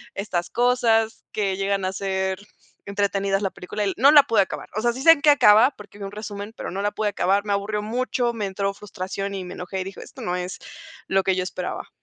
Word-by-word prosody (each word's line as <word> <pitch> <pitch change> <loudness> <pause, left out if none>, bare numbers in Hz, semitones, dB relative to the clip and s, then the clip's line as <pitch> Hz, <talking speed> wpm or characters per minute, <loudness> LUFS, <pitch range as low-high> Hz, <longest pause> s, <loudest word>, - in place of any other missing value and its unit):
estas 190 -4 -2
cosas 235 -2 +2
que 200 -3 -1
llegan 195 0 -1
a 185 - -2
ser 190 -1 -2 0.5
entretenidas 200 0 0
la 195 - 0
película, 205 +3 -4
y 195 - 0
no 270 +5 +6
la 295 -2 +9
pude 225 -5 +3
acabar. 190 - -4
O 215 - -1
sea, 240 +1 +2
sí 260 +2 -6
sé 325 - +9
en 320 -3 +4
qué 300 - +5
acaba 250 -3 +6
porque 205 0 -13
vi - - -7
un 195 - -6
resumen, 205 0 -7
pero - - -5
no 195 +2 -3
la 205 - +1
pude 215 0 -1
acabar. 200 0 +1
Me 205 - 0
aburrió 210 +1 -2
mucho, 240 +2 -1
me 215 -3 -3
entró 195 +1 -2
frustración 195 0 -5
y 190 - -4
me 180 - -8
enojé, 185 +1 -5
y - - -2
dije: 195 +1 -9
"Esto - - -12
no 180 - -1
es 180 +1 -4 0.5
lo 195 0 +2
que 190 -1 +1
yo 185 - 0
esperaba". 180 0 -5
200 Hz, 240 wpm, -23 LUFS, 190-220 Hz, 0.5 s, la